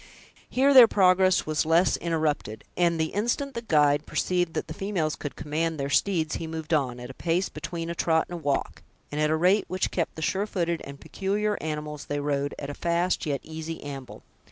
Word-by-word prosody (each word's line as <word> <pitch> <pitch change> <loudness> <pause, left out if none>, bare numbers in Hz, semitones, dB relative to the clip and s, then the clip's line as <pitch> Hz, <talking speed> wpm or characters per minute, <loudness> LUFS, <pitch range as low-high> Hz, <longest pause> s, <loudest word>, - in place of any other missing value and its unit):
Here 275 +2 +3
their 255 -3 +10
progress 185 -2 +4
was 155 0 0
less 165 +3 +3
interrupted; 155 -10 -2
and 170 -2 +2
the 160 0 -1
instant 240 +7 -1
the 235 - -4
guide 150 -7 +3
perceived 175 -2 0
that - - -2
the 160 - -6
females 175 -4 -1
could 145 - -6
command 155 +2 -2
their 140 0 -2
steeds, 160 -3 +1
he 165 - -5
moved 160 0 -4
on, 130 -5 +1
at 125 +1 -7
a - - -12
pace 175 +6 0
between 165 +2 -5
a 170 - -2
trot 160 -1 +2
and 175 -1 -6
a - - -14
walk, 140 -2 -1 0.3
and 150 +1 -2
at 155 - +2
a 155 - +2
rate 185 +5 +3
which 185 0 -1
kept 170 - -2
the 160 - -5
sure 195 +5 0
footed 170 -4 -1
and 140 0 -9
peculiar 205 +2 -1
animals 150 -2 -4
they 145 - -2
rode 145 0 -1
at 140 - -5
a - - -6
fast 170 +2 0
yet 140 -2 -1
easy 160 +1 -6
amble. 135 -3 -8
160 Hz, 210 wpm, -26 LUFS, 150-180 Hz, 0.3 s, their